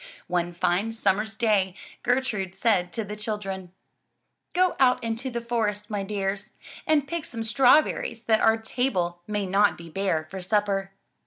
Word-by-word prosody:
One 175 -1 -1
fine 185 +6 +1
sum 200 -4 +2
mer's 220 +1 -4
day 205 -5 +2 0.3
Gertrude 240 -7 0
said 195 -4 +2
to 225 - -2
the 210 +1 -6
children: 195 -4 -4 0.8
"Go 365 0 +3
out 255 -3 +4
into 230 +3 -2
the 235 -1 -3
forest, 215 -3 -2
my 205 -1 -1
dears, 195 0 -3 0.3
and 295 -3 +3
pick 340 0 -3
some 230 -4 -5
straw 260 +6 +6
berries 230 -5 -5
that 220 -1 +3
our 225 0 +5
table 195 -7 -1
may 210 -1 -1
not 200 +2 +3
be 170 -1 -11
bare 165 -4 -1
for 190 -1 -5
supper." 195 0 0
210 Hz, 165 wpm, -26 LUFS, 190-230 Hz, 0.8 s, straw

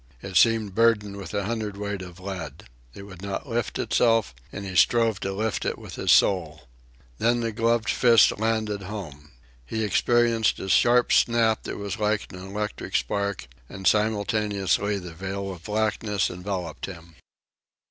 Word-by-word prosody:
It 95 -1 -7
seemed 110 -1 +4
burdened 105 -2 +2
with 100 -3 -8
a 100 - 0
hundredweight 105 -2 -3
of 90 -1 -10
lead. 90 -7 -7 0.3
It - - -9
would 95 -3 -12
not 100 +6 -5
lift 120 -2 -2
itself, 115 - +2 0.2
and 100 - -6
he 95 -1 -6
strove 115 +1 +3
to 95 - -3
lift 105 +1 -2
it - - -2
with - - -10
his - - 0
soul. 80 -7 +3 0.6
Then 120 +1 +2
the 115 -1 -1
gloved 115 0 +1
fist 115 -5 +5
landed 110 -2 -1
home. 90 -7 -8 0.3
He 110 - -3
experienced 115 +1 +2
a 95 - -6
sharp 120 +7 +4
snap 115 -2 +3
that - - -5
was 100 +1 -5
like 105 -1 -1
an 90 - -8
electric 105 +3 -5
spark, 100 - -1 0.2
and, 95 0 -9
simultaneously, 105 -2 +1
the 90 -3 -8
veil 95 +3 -5
of 85 -2 -11
blackness 105 -1 0
enveloped 90 -3 -5
him. 85 -3 -11
100 Hz, 155 wpm, -25 LUFS, 95-110 Hz, 0.6 s, fist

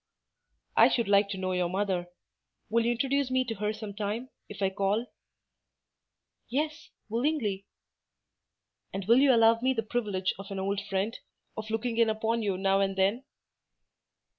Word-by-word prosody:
"I - - +7
should 235 -4 0
like 200 0 +4
to 195 - -4
know 185 0 -2
your 180 -1 0
mother. 185 -2 -1 0.6
Will 230 0 +3
you 240 - +3
introduce 275 +2 0
me 255 0 +1
to 235 - -3
her 210 0 -1
some 215 -1 -7
time, 215 +5 -3 0.2
if - - -5
I 190 - +2
call?" 200 +4 0 1.4
"Yes, 300 +4 -2 0.2
willingly." 225 -5 -1 1.2
"And 195 0 -4
will 235 +5 +6
you 275 0 +6
allow 230 -1 +5
me 260 +1 +2
the 225 -3 -1
privilege 205 -5 -1
of 195 - -8
an 195 - -5
old 195 +1 -1
friend, 195 +3 -1 0.4
of 220 0 -6
looking 225 +1 -2
in 230 -1 +4
upon 225 +1 0
you 200 -3 -1
now 195 +1 +2
and 195 0 +1
then?" 200 +7 +1
215 Hz, 165 wpm, -29 LUFS, 195-235 Hz, 1.4 s, I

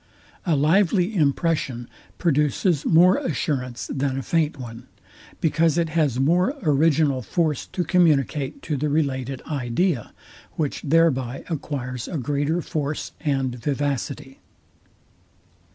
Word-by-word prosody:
A 165 - +3
lively 180 +6 +2
impression 145 -6 0 0.3
produces 150 0 +1
more 180 +3 +6
assurance 125 -5 -2
than 135 -1 -2
a 135 - -3
faint 160 0 0
one; 120 -1 -9 0.5
because 160 0 +2
it 170 -1 +1
has 150 -6 +1
more 180 - +2
original 150 -3 +3
force 155 +2 -1
to 180 - -2
communicate 155 - +1
to 150 - -2
the 150 +3 -1
related 135 -3 -1
idea, 140 - -1 0.4
which 150 -3 -2
thereby 135 -5 +1
acquires 130 -5 -4
a 170 - -3
greater 145 +5 -1
force 150 -1 -3
and 135 -4 0
vivacity. 140 -1 -3
145 Hz, 115 wpm, -23 LUFS, 135-165 Hz, 0.5 s, more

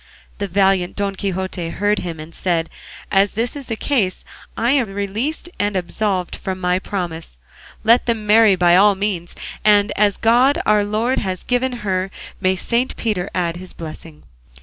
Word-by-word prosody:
The 200 - -1
valiant 190 -1 +2
Don 200 -1 -1
Quixote 190 -3 -3
heard 205 +4 0
him, 165 -3 -5
and 155 +2 -9
said, 165 -2 -1 0.4
"As 195 0 +3
that 230 +5 -2
is 280 -3 -7
the 225 - -2
case 220 -7 -1 0.3
I 235 +2 +2
am 255 -8 +1
released 220 - -2
and 205 0 0
absolved 185 0 -1
from 190 -1 -4
my 180 0 +1
promise; 170 - -5 0.5
let 230 +3 +4
them 225 -3 -1
marry 215 -1 +6
by 175 -1 +4
all 200 +2 +6
means, 190 -4 -3 0.3
and 205 0 +4
as 205 -1 +2
'God 245 +5 +4
our 210 -1 +4
Lord 220 +5 0
has 185 -3 -3
given 250 +1 0
her, 190 -1 0 0.3
may 185 -1 +2
Saint 235 +7 -1
Peter 205 -5 -2
add 170 -2 -1
his 185 +1 -9
blessing. 160 -1 -10
200 Hz, 170 wpm, -20 LUFS, 180-220 Hz, 0.5 s, marry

